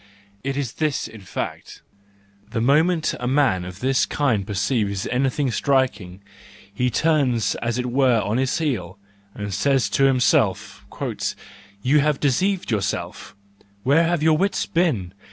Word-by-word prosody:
It 135 +1 -2
is 135 -5 -3
this 155 -3 -1
in 110 - -12
fact: 95 -2 -6 0.7
the 115 - -2
moment 155 +7 +2
a 125 - -3
man 130 -9 +2
of 90 +1 -9
this 130 +1 +2
kind 115 -9 0
perceives 100 -1 -1
anything 135 +1 0
striking, 125 -9 0 0.5
he 125 +5 0
turns 130 -8 +1
as 120 0 -1
it 125 - -2
were 125 -1 +3
on 105 +2 -1
his 130 0 0
heel, 110 - -2 0.4
and 105 -1 -5
says 135 +5 +1
to 135 - +3
himself: 130 -2 +1 1.0
"You 145 +4 +4
have 150 -1 +1
deceived 180 +5 0
yourself! 100 0 -3 0.5
Where 145 +6 +4
have 170 -2 0
your 155 -1 +4
wits 200 +1 0
been! 120 - 0
130 Hz, 140 wpm, -22 LUFS, 105-145 Hz, 1.0 s, You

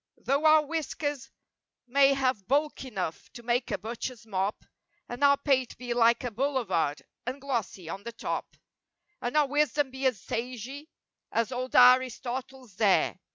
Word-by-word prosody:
Though 280 +3 0
our 310 -1 +6
whiskers 295 -3 -3 0.6
may 275 +2 +4
have 255 -7 0
bulk 290 +2 0
enough 190 -10 -5
to 240 -2 -10
make 240 +1 0
a - - -1
butcher's 235 +1 -6
mop, 195 -1 -2 0.4
And 240 +3 -5
our 280 0 +6
pate 270 -3 0
be 245 0 -3
like 235 0 +4
a 245 - -3
boulevard, 215 - -1 0.2
and 255 +3 -3
glossy 235 - -3
on 195 +4 -5
the 235 +3 -6
top; 230 - -5 0.6
And 245 +5 -1
our 300 - +5
wisdom 290 -1 +1
be 265 0 0
as 250 -7 -1
sagey 250 - -5 0.4
as 230 +2 0
old 255 0 -4
Aristotle's 255 -1 +3
dare. 195 -2 +2
255 Hz, 155 wpm, -28 LUFS, 230-275 Hz, 0.6 s, our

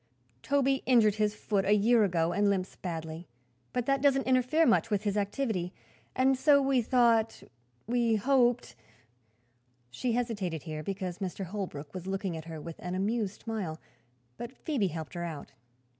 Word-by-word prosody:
Toby 275 - +1
injured 230 -5 +5
his 210 -1 +1
foot 205 -2 0
a 200 +2 +3
year 225 +2 +4
ago 170 -4 +1
and 205 +2 +2
limps 190 -1 -1
badly, 165 -1 -6 0.4
but 245 -2 -1
that 275 0 +1
doesn't 270 -1 +3
interfere 260 +5 +3
much 230 -2 +3
with 205 -1 0
his 205 -2 -1
activity, 205 -3 -1 0.4
and 265 +1 +3
so 280 +2 +5
we 270 -2 +2
thought 230 -2 +2 0.4
we 235 -1 +2
hoped 240 - +2 0.6
" 120 +1 -42 0.3
She 235 - -2
hesitated, 205 - -2
here, 155 -2 -5
because 185 +1 -4
Mr. 190 0 -4
Holbrook 175 -7 -6
was 185 0 -7
looking 190 -2 -2
at 160 -1 -7
her 165 -1 -7
with 165 +1 -8
an 180 0 -4
amused 205 +1 -2
smile. 195 -9 -4 0.6
But 240 +1 -6
Phoebe 260 - -1
helped 160 -5 -6
her 175 - -4
out. 160 -5 -6
205 Hz, 165 wpm, -30 LUFS, 175-245 Hz, 0.6 s, injured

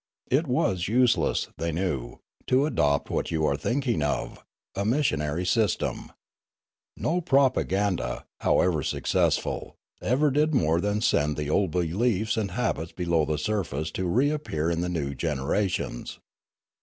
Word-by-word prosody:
It 145 +5 +2
was 95 -8 +1
useless, 125 +3 +2
they 85 0 -1
knew, 75 -9 -2 0.3
to 130 +3 +3
adopt 70 - +1
what - - -1
you 80 -2 0
are 70 - +2
thinking 120 - -1
of, 75 -1 -2 0.3
a 100 - -2
missionary 90 - 0
system. 110 +3 0 0.9
No 175 +3 0
propa 135 -4 +3
ganda, 95 -10 -1
however 85 -5 +2
successful, - - 0 0.3
ever 140 +5 +2
did 150 +2 +2
more 80 -6 +2
than 105 +1 0
send 75 -9 +2
the 75 0 -2
old 100 +1 +2
beliefs 95 +7 0
and 110 -3 -1
habits 95 -9 -2
below 85 -3 +1
the 75 0 -1
surface 80 -4 -2
to 95 +2 -2
reappear 125 - 0
in 85 0 -1
the 90 - -1
new 75 -5 -2
generations. 75 +1 -2
90 Hz, 140 wpm, -26 LUFS, 80-120 Hz, 0.9 s, to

